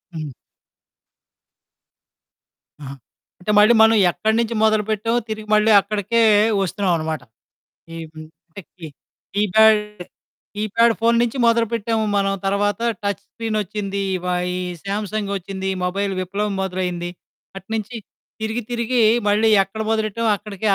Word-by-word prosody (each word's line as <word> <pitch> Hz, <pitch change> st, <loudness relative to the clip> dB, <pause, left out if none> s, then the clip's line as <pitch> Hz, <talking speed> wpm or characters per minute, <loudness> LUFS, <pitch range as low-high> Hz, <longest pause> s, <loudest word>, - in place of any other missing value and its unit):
హ్మ్. 155 Hz, -4 st, -6 dB, 2.5 s
ఆహా! 135 Hz, -1 st, -7 dB, 0.5 s
అంటే 195 Hz, +4 st, -2 dB
మళ్ళీ 215 Hz, +3 st, +6 dB
మనం 225 Hz, 0 st, +6 dB, 0.2 s
ఎక్కడి 215 Hz, +8 st, -1 dB
నుంచి 235 Hz, 0 st, -1 dB
మొదలుపెట్టామో 215 Hz, +1 st, +1 dB
తిరిగి 215 Hz, 0 st, -5 dB
మళ్ళీ 215 Hz, +1 st, +3 dB
అక్కడికే 210 Hz, +3 st, -1 dB, 0.4 s
వస్తున్నాం 195 Hz, 0 st, -1 dB
అనమాట. 160 Hz, -1 st, -4 dB, 0.8 s
ఈమ్ 160 Hz, -1 st, -9 dB, 0.4 s
టెక్కి 175 Hz, -3 st, -11 dB, 0.5 s
కీప్యాడ్ 210 Hz, +2 st, +4 dB, 0.8 s
కీప్యాడ్ 215 Hz, +3 st, +2 dB
ఫోను 230 Hz, +1 st, +3 dB
నుంచి 240 Hz, +2 st, -2 dB
మొదలుపెట్టాము 230 Hz, -1 st, +1 dB
మనం 195 Hz, 0 st, +1 dB
తర్వాత 205 Hz, +1 st, 0 dB, 0.2 s
టచ్ 200 Hz, 0 st, -2 dB
స్క్రీనొచ్చింది. 210 Hz, -3 st, -3 dB, 0.2 s
ఇవ 180 Hz, -, -8 dB, 0.3 s
ఈ -, -, -3 dB, 0.2 s
సామ్సంగొచ్చింది 200 Hz, -2 st, -4 dB, 0.2 s
మొబైల్ 195 Hz, +2 st, -1 dB
విప్లవం 200 Hz, +3 st, -3 dB
మొదలైంది. 180 Hz, -2 st, -3 dB, 0.5 s
అటునుంచి 215 Hz, +4 st, -5 dB, 0.5 s
తిరిగి 220 Hz, +2 st, -2 dB
తిరిగి 240 Hz, +1 st, 0 dB, 0.3 s
మళ్ళీ 210 Hz, +2 st, +3 dB
ఎక్కడ 195 Hz, +3 st, -8 dB
మొదలెట్టామో 220 Hz, +1 st, -1 dB
అక్కడికే 205 Hz, 0 st, -7 dB
210 Hz, 105 wpm, -20 LUFS, 195-220 Hz, 2.5 s, మళ్ళీ